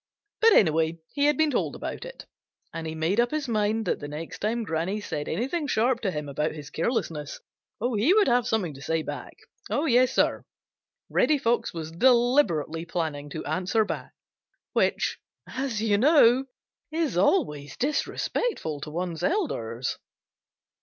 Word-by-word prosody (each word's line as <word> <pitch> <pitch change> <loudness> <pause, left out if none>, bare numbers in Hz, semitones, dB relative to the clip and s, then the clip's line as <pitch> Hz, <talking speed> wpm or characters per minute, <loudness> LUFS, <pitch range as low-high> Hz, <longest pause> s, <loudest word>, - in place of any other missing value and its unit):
But 450 -1 +6
anyway, 160 - +3 0.2
he 285 0 +2
had 295 0 +3
been 315 -1 +3
told 250 - -1
about - - -5
it, - - -10 0.5
and 165 -1 -4
he 160 - -4
made 165 +7 0
up 240 0 +3
his 300 -1 -2
mind 215 0 0
that - - 0
the 145 - -6
next 150 +3 -7
time 225 +3 -1
Granny 175 +2 -2
said 150 -7 -4
anything 275 - -1
sharp 245 0 +1
to 200 - 0
him 150 -4 -4
about 150 +2 -1
his 150 -2 -9
carelessness 160 - -2 0.4
he 240 - +2
would 415 +1 +5
have 245 -1 +3
something 200 -10 0
to 135 - -12
say 160 +2 -1
back. - - -7 0.3
Yes, 255 -4 +3
Sir, - - +2 0.6
Reddy 305 - +3
Fox 240 -3 0
was 160 -2 -6
deliberately 225 - +3
planning 155 -4 -3
to 155 +2 -6
answer 185 +8 +1
back, - - -5 0.6
which, - - +1 0.3
as 250 -5 -3
you 205 -2 +2
know, 265 -2 +5 0.5
is 320 - -1
always 150 -5 +1
disrespectful 275 - -1
to 150 - -6
one's 170 +1 -4
elders. 130 - -1
210 Hz, 155 wpm, -26 LUFS, 160-260 Hz, 0.6 s, But